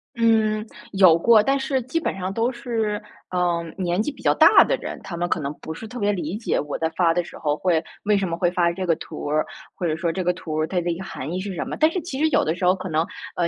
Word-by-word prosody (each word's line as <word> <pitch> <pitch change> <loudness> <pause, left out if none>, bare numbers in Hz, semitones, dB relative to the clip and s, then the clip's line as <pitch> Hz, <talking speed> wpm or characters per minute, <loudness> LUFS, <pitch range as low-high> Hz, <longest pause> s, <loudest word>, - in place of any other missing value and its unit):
嗯， 220 -2 +2 0.3
有 185 -4 +6
过。 220 +5 +6
但 275 +6 +2
是 265 -1 0
基 265 +7 -1
本 - - -2
上 185 0 -3
都 230 +4 +1
是， 225 -4 -2 0.3
嗯， 170 -2 0
年 180 0 0
纪 295 - -2
比 - - -15
较 - - +3
大 - - +7
的 - - +1
人， - - -7
他 175 - -6
们 175 +1 -1
可 - - 0
能 145 -1 -3
不 160 - -6
是 220 +7 -8
特 245 +2 -7
别 205 0 +2
理 175 0 -3
解 225 - -1
我 150 -1 -3
在 160 - 0
发 170 -3 +4
的 175 0 0
时 - - -11
候 150 -1 0
会 165 0 +1 0.2
为 210 0 +3
什 195 -1 0
么 170 - -2
会 175 0 +1
发 175 -1 +2
这 185 +1 -4
个 170 - +3
图 - - -8
儿， 155 +1 +1 0.3
或 180 - -4
者 155 - 0
说 165 +1 -1
这 185 - -3
个 180 - +2
图 175 -3 -7
儿， 155 0 0
它 180 0 -1
的 175 0 -1
一 165 - -3
个 190 - -6
含 155 -5 -6
义 180 - -2
是 195 +1 -4
什 - - -2
么。 - - -5
但 310 - +5
是 360 +2 -3
其 285 -5 -6
实 315 - +4
有 - - +3
的 160 - 0
时 180 - -2
候 180 +1 +5
可 185 0 -6
能， 160 +1 +1 0.3
呃 170 -1 +2
185 Hz, 315 characters per minute, -23 LUFS, 170-220 Hz, 0.3 s, 大